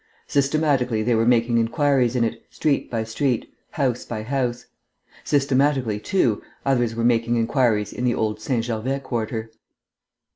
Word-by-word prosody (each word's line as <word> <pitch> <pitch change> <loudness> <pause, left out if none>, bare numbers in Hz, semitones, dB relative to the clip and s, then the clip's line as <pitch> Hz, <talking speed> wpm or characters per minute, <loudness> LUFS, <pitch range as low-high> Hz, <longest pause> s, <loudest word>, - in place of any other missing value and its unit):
Systematically 140 -5 +1
they 120 +2 +2
were 115 0 +2
making 120 -1 +3
inquiries 130 0 +2
in 120 - +2
it, 115 - -2
street 150 -3 0
by 115 -2 -1
street, 115 +2 -2 0.2
house 130 -4 -1
by 110 -2 -5
house. 125 -1 -2 0.6
Systematically, 135 -5 +1
too, 115 - +1 0.2
others 120 -4 +1
were 115 - -2
making 120 0 +2
inquiries 115 -3 +1
in 125 - -5
the 125 -1 +2
old 110 -1 -1
St. 115 0 -1
Gervais 120 +4 -2
quarter. 115 -3 -3
120 Hz, 145 wpm, -23 LUFS, 115-135 Hz, 0.6 s, making